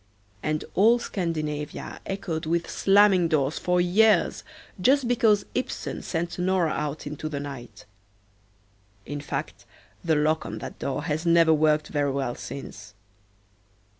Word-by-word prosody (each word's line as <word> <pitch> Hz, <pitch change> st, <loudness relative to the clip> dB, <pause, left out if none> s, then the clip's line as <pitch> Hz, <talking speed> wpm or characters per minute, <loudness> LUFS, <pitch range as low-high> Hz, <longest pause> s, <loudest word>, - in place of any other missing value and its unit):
And 155 Hz, 0 st, -2 dB
all 225 Hz, +5 st, +5 dB
Scandinavia 155 Hz, -8 st, -4 dB
echoed 170 Hz, -5 st, -3 dB
with 170 Hz, +1 st, 0 dB
slamming 195 Hz, -3 st, +4 dB
doors 150 Hz, -2 st, 0 dB
for 180 Hz, 0 st, +1 dB
years 195 Hz, +2 st, +3 dB, 0.4 s
just 265 Hz, +4 st, +3 dB
because 225 Hz, -4 st, +3 dB
Ibsen 255 Hz, -, -3 dB
sent 170 Hz, +1 st, -3 dB
Nora 180 Hz, -3 st, +1 dB
out 150 Hz, 0 st, -3 dB
into 150 Hz, +1 st, -5 dB
the 145 Hz, -2 st, -4 dB
night. 125 Hz, -8 st, -9 dB, 1.2 s
In 145 Hz, 0 st, -5 dB
fact 145 Hz, -, -5 dB, 0.4 s
the 160 Hz, -2 st, +2 dB
lock 155 Hz, +1 st, +1 dB
on -, -, -6 dB
that -, -, -8 dB
door 140 Hz, +2 st, -3 dB
has 150 Hz, +1 st, -2 dB
never 165 Hz, -1 st, +5 dB
worked 155 Hz, 0 st, +2 dB
very 145 Hz, -1 st, 0 dB
well 135 Hz, -3 st, -2 dB
since. 105 Hz, -7 st, -9 dB
160 Hz, 135 wpm, -25 LUFS, 150-185 Hz, 1.2 s, all